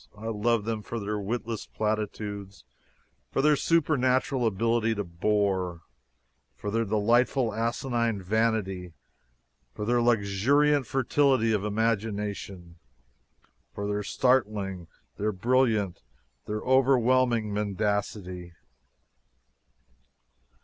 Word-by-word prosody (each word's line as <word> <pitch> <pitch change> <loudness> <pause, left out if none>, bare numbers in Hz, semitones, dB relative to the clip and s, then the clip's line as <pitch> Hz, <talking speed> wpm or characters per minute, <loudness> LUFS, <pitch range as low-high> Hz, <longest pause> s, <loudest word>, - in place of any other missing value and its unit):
I 110 +2 -5
love 115 0 0
them 110 -1 -2
for 115 +3 -5
their 105 0 -3
witless 115 +2 -4
platitudes, 105 -2 -4 0.7
for 135 - 0
their 150 0 +5
supernatural 135 -5 +2
ability 115 +2 +1
to 105 - -2
bore, 95 -1 -1 0.7
for 105 - -5
their 115 +1 0
delightful 115 +3 +2
asinine 115 -1 -1
vanity, 95 -3 -1 0.8
for 105 - -4
their 120 +2 +2
luxuriant 120 +6 +2
fertility 135 -3 +2
of 105 -2 0
imagination, 105 -5 -2 1.0
for 100 - -4
their 105 0 -1
startling, 105 -7 0 0.3
their 105 +1 0
brilliant, 110 -2 +1 0.5
their 105 0 -3
overwhelming 130 -4 +3
mendacity! 100 -3 -2
110 Hz, 95 wpm, -27 LUFS, 100-120 Hz, 1.0 s, their